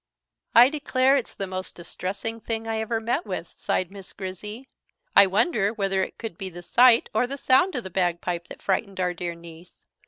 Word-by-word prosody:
"I 240 +3 +9
declare 275 -2 +2
it's 265 -5 -2
the 195 - -3
most 185 0 -6
distressing 195 +6 -5
thing 225 0 -4
I 225 0 -1
ever 225 +1 -1
met 235 +9 -1
with," - - -6
sighed 185 0 -1
Miss 195 -2 -11
Grizzy. 210 +6 -7 0.5
"I 200 - +8
wonder 205 - +2
whether 195 -2 0
it - - -4
could 225 -7 -7
be 190 - -3
the 175 0 -10
sight 240 +5 +5
or 220 +3 +2
the 275 +2 -5
sound 275 +8 +3
of 250 - -2
the 190 - -7
bagpipe 175 -1 -1
that - - -11
frightened 195 0 -1
our 180 -1 0
dear 175 0 -4
niece. 170 +1 -14
200 Hz, 195 wpm, -25 LUFS, 185-235 Hz, 0.5 s, I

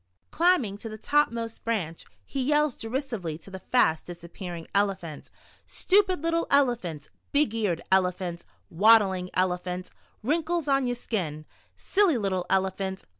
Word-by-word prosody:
Climbing 320 - +2
to 225 - -6
the 215 - -7
top 295 +7 +2
most 230 -1 -5
branch, 185 -8 -2 0.2
he 275 - -3
yells 295 0 +2
derisively 225 - -4
to 175 +4 -14
the 190 - -7
fast 160 -9 +2
disap 170 -1 -10
pearing 175 -4 -6
Elephant: 190 -6 -1 0.2
" - - -31
Stupid 375 -4 +3
little 335 0 +1
Elephant, 235 - +1 0.2
Big 285 -6 +2
eared 205 -7 -1
Elephant, 180 -2 +1 0.3
Waddling 195 -1 +4
Elephant, 180 0 -1 0.3
Wrinkles 325 +4 0
on 275 -2 +2
yer 245 - -1
skin, 165 -11 -4 0.3
Silly 385 -8 +2
little 190 -4 -1
Elephant. 190 0 -1
205 Hz, 140 wpm, -27 LUFS, 180-275 Hz, 0.3 s, Waddling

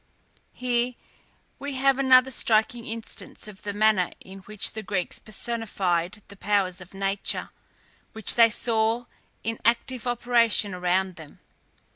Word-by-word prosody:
Here 245 0 0 0.6
we 285 0 -5
have 270 0 +3
another 260 -1 +6
striking 230 0 +1
instance 225 -1 -7
of 205 -2 -11
the 205 - -4
manner 205 -3 +3
in 190 +1 -12
which 205 +1 -1
the 220 - -5
Greeks 195 -4 -2
personified 205 -4 -2
the 200 - -13
powers 195 -2 0
of 185 +1 -13
nature, 195 0 -2 0.6
which 220 -2 +2
they 230 -1 +6
saw 225 +1 +1 0.4
in 225 0 -3
active 240 +1 +1
operation 235 -4 +2
around 180 +1 0
them. 155 -3 -13
220 Hz, 130 wpm, -26 LUFS, 195-240 Hz, 0.6 s, another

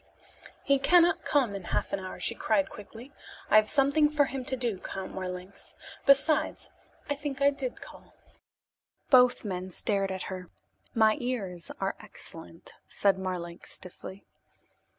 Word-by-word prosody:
"He 280 -1 +3
cannot 345 +4 +4
come 265 -8 +2
in 195 -3 -6
half - - -2
an - - 0
hour," 185 -1 -7
she 205 - 0
cried 210 -4 +1
quickly. 225 +6 -11 0.4
"I 215 - +8
have 215 0 +4
something 290 +1 +4
for 300 -1 +3
him 270 -1 -5
to 260 - -2
do, 235 -6 -2
Count 190 0 -6
Marlanx. 185 +1 -7 0.3
Besides, 275 +3 +3 0.4
I 290 - 0
think 285 -1 -5
I 280 0 +5
did 265 -3 -5
call." - - -14 1.0
Both 250 -3 +6
men 185 -2 -4
stared 195 +1 -1
at 190 -1 -4
her. 185 -2 -7 0.5
"My 220 0 +4
ears 200 - -3
are - - -1
excellent," 85 -1 -11
said 195 -2 +2
Marlanx 175 -2 -5
stiffly. 190 +2 -9
220 Hz, 150 wpm, -29 LUFS, 190-275 Hz, 1.0 s, I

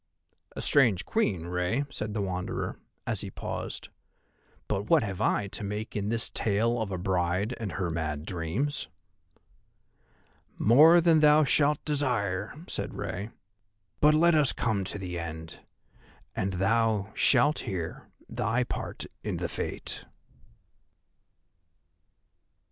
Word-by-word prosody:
"A - - -4
strange 115 -10 +3
Queen, 95 - 0
Rei," 90 +10 -1
said 105 -3 -4
the 105 - 0
Wanderer, 90 -1 -3 0.3
as - - -1
he - - -5
paused, - - -5 0.8
"but 100 +2 -2
what 160 -6 +5
have 100 -2 -4
I 105 - +2
to 105 - -6
make 105 +2 -4
in 105 -1 -1
this 115 0 0
tale 115 +3 +1
of 105 -3 -3
a 95 - -2
bride 90 +4 0
and 105 -6 -4
her 90 -3 -2
mad 80 -2 -3
dreams?" 95 - -2 1.7
"More 155 +9 +7
than 165 -2 +5
thou 150 0 +6
shalt 145 +1 +2
desire," 120 -10 -1
said - - -4
Rei; 100 +5 -4 0.7
"but 150 +1 +5
let 170 +2 +5
us 150 -4 +4
come 110 -4 0
to 95 - -4
the 90 -3 -4
end, 80 -1 -7 0.8
and 95 0 -1
thou 110 +2 +1
shalt 140 +4 +3
hear 85 -4 -5 0.2
thy 120 +3 0
part - - -5 0.2
in - - -2
the - - -2
Fate." - - -5
105 Hz, 130 wpm, -28 LUFS, 90-135 Hz, 1.7 s, More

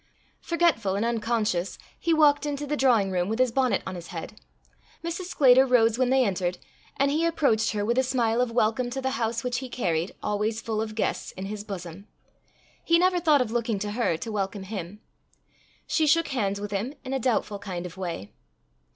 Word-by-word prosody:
Forgetful 335 - +1
and 205 +3 0
unconscious, 225 -5 -1 0.2
he 335 - 0
walked 300 -2 +4
into 290 0 -3
the 295 +1 -1
drawing 235 -9 +3
room 180 +1 0
with 220 - -1
his 255 -1 +3
bonnet 255 -4 +1
on 190 - -4
his 175 -2 -8
head. 170 +4 -7 0.7
Mrs. 335 +2 -4
Sclater 265 -7 +5
rose 240 -3 +3
when 255 -1 +3
they 260 -1 +4
entered, 180 -3 -1 0.4
and 275 +1 +2
he 310 +3 +1
approached 275 -10 +2
her 205 -1 -1
with 235 +3 +2
a - - +3
smile 245 -3 +1
of 250 - +1
welcome 230 +1 +1
to 265 +2 -4
the 265 0 -1
house 235 -2 -1
which 250 -1 -1
he 260 -1 -7
carried, 175 -8 -1
always 210 +2 -1
full 220 -1 -2
of 215 -1 -4
guests, 220 - -2
in 190 - -6
his 205 +1 -5
bosom. 195 -1 -8 0.8
He 335 - +4
never 360 +1 +3
thought 305 -5 +4
of 235 -3 -2
looking 235 -2 0
to 205 +1 -3
her 210 -7 0
to 225 +7 -6
welcome 195 -1 -3
him. 195 0 -7 0.8
She 315 -2 +1
shook 330 +2 +3
hands 200 -7 -1
with 205 0 -5
him 215 +8 -3
in 265 0 -5
a 270 - 0
doubtful 220 -4 0
kind 185 -3 -5
of 180 - -8
way. 170 - -5
225 Hz, 205 wpm, -26 LUFS, 200-265 Hz, 0.8 s, Sclater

